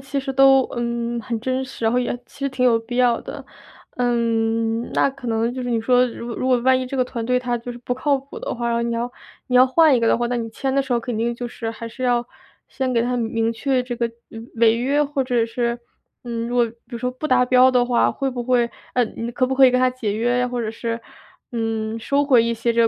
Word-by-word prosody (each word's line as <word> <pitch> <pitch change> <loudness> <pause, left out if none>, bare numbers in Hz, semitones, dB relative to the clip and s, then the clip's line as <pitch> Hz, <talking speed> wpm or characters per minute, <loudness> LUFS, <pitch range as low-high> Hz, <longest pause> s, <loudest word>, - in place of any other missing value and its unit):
其 275 +1 -4
实 270 - -2
都， 270 0 +6
嗯， 235 0 -2
很 230 0 -3
真 260 +2 -1
实， 260 -3 -7
然 225 - +3
后 245 - +2
也 245 -1 -1
其 - - -20
实 275 0 -1
挺 260 -1 -1
有 235 -2 +4
必 235 +2 -7
要 245 -2 +3
的。 - - -8 0.5
嗯， 230 -1 0
那 - - +3
可 270 -2 -11
能 230 +1 0
就 255 0 -5
是 245 - -3
你 230 - +1
说 250 +2 +3
如 235 0 -7
果 235 - -5
如 255 - -2
果 250 -1 +4
万 260 +1 +4
一 255 - -3
这 270 - -5
个 255 - +2
团 240 -2 -5
队 250 +1 +2
它 245 -1 -2
就 235 +1 -7
是 240 - -7
不 245 +1 -4
靠 280 +3 +1
谱 275 +1 -9
的 - - -4
话， 235 -1 -1
你 235 0 -1
要 240 +2 -3 0.4
你 250 - -2
要 255 - +7
换 310 +2 +5
一 245 - +2
个 230 - +1
的 - - +4
话， 240 +1 -1
那 245 - -1
你 230 -1 -3
签 265 +4 -3
的 275 - +3
时 270 - -13
候 240 - +3
肯 235 -1 -4
定 235 +1 0
就 245 +1 -5
是 230 -1 -5
还 230 0 -8
是 230 +3 -8
要 240 -1 +1 0.4
先 260 -1 -3
给 230 - +3
他 245 +1 -1
明 225 0 0
确 260 +2 0
这 250 -1 -5
个， 235 -1 -1 0.2
嗯， 225 +1 -10
违 225 -1 +4
约， 275 +5 +1
或 280 -1 -1
者 245 -3 +1
是， 235 +1 -2 0.5
嗯， 235 -1 -3
如 245 - -2
果 240 - +5
比 - - -19
如 235 - -6
说 250 +1 -1
不 255 +5 -5
达 250 -1 +4
标 255 +1 +5
的 250 -1 +3
话， 245 -1 +2
会 275 -1 -2
不 245 -1 -4
会 240 -1 +1 0.2
呃， 250 - +3
你 230 +1 -6
可 255 +2 0
不 265 - -1
可 265 0 +7
以 - - +5
跟 250 - +2
他 255 0 +3
解 230 -5 -3
约 240 +3 +1
呀？ 250 0 +1
或 245 -1 -3
者 215 - -2
是， 230 +1 -4 0.5
嗯， 225 -2 -2
收 280 +5 +1
回 255 -5 +5
一 230 0 0
些 230 +1 0
这 230 - +2
245 Hz, 295 characters per minute, -21 LUFS, 230-255 Hz, 0.5 s, 要